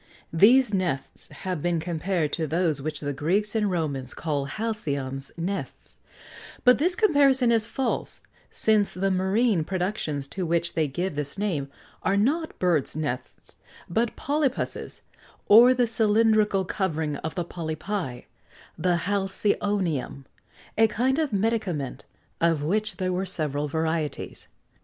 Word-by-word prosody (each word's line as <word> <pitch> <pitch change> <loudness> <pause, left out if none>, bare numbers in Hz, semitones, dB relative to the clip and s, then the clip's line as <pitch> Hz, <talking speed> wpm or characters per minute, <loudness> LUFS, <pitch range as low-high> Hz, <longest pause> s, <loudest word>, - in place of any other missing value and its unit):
These 230 +7 +5
nests 175 -9 -1
have 185 -5 -5
been 175 0 0
compared 170 -1 -1
to 160 -2 -1
those 160 -2 0
which 155 +2 -4
the 145 -1 -2
Greeks 185 +9 0
and 215 -2 +1
Romans 145 -8 -2
called 145 -4 -2
halcyon's 140 -11 -3
nests; 185 +4 -5 0.7
but 250 -1 +6
this 355 +4 +2
comparison 280 - +4
is 225 -1 +2
false, 255 0 -2 0.3
since 215 -2 +2
the 195 +1 0
marine 190 0 +2
productions 180 -6 -2
to 190 - -4
which 170 0 0
they 160 -2 +1
gave 175 +7 -3
this 145 +2 -3
name 170 -9 -1 0.3
are 195 +1 +1
not 305 +10 0
birds' 170 -7 +1
nests 145 -5 -5 0.3
but 225 +6 0
polypus's, 285 -2 -2 0.4
or 235 +4 +8
the 250 -1 +3
cylindrical 215 -3 +3
covering 160 -6 -2
of 160 - -5
the 175 -2 -2
polypi 165 -4 -4 0.5
the 180 -1 +1
halcyonium 195 -7 -1 0.5
a 225 - +7
kind 255 +6 +1
of 310 -5 0
medicament, 195 - -1 0.4
of 165 -3 +2
which 215 +7 -1
there 185 -1 -1
were 190 +2 -1
several 150 -5 -1
varieties. 160 -1 -2
185 Hz, 135 wpm, -26 LUFS, 155-215 Hz, 0.7 s, or